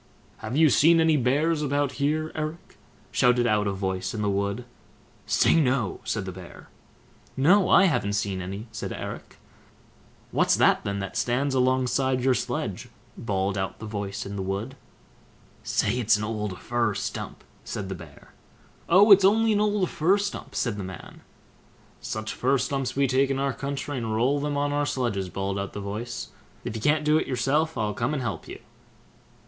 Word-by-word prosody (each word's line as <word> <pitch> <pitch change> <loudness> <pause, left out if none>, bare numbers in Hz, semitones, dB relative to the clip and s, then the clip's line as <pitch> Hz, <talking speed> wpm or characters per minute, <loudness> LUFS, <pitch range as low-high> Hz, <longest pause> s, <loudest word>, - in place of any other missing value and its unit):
"Have 110 +5 -4
you 155 -2 +5
seen 165 +6 +5
any 160 -1 +4
bears 150 +5 +1
about 145 -1 0
here, 155 +2 0
Eric?" 155 +2 -6 0.3
shouted 125 -1 +3
out 105 -2 +2
a - - +1
voice 95 0 -3
in 105 - -2
the 100 - +1
wood. 100 +4 -2 0.6
"Say, - - +3
no!" 125 -7 0
said 105 -3 -2
the 95 - -5
Bear. 90 -1 -12 0.7
"No, 180 +8 +4
I - - +7
haven't 105 - +1
seen 100 -2 -1
any", 100 +4 -6
said 110 - -5
Eric. - - -7 0.9
"What's - - +3
that - - +3
then, 100 0 -2
that 100 - -6
stands 130 +3 0
alongside 130 0 +1
your 130 0 +4
sledge?" - - -3 0.3
bawled 100 -2 -1
out 95 - -3
the 110 - -8
voice 100 -2 -4
in 100 0 -6
the - - -2
wood. 100 +7 -3 0.9
"Say 125 - 0
it's 110 -3 +3
an 105 - -4
old 105 -3 -3
fir 115 -3 0
stump", - - -5 0.2
said 100 - -5
the 95 - -4
Bear. 90 - -13 0.6
"Oh, 200 +5 +6
it's 200 -1 +9
only 220 +3 +4
an 205 - +2
old 205 -3 +1
fir 170 +6 +2
stump", 200 0 -5
said 115 -4 -1
the 100 - -4
man. 95 -2 -10 0.8
"Such 110 0 -4
fir 135 +2 +1
stumps 135 0 -2
we 140 0 +3
take 135 +1 +2
in 135 - 0
our 135 0 0
country 140 0 -4
and 110 -2 -2
roll 130 +6 +2
them 145 0 -2
on 145 0 0
our 145 0 0
sledges", 100 -8 -1
bawled 95 +2 -3
out 100 0 -5
the - - -5
voice; 105 +4 -5 0.3
"if 110 - -5
you 110 - -4
can't 150 +4 +2
do 150 +1 +4
it - - -3
yourself, 140 +5 0
I'll 105 -1 -1
come 120 +7 -1
and 135 - -2
help 115 -3 -4
you." - - -8
125 Hz, 185 wpm, -26 LUFS, 100-145 Hz, 0.9 s, it's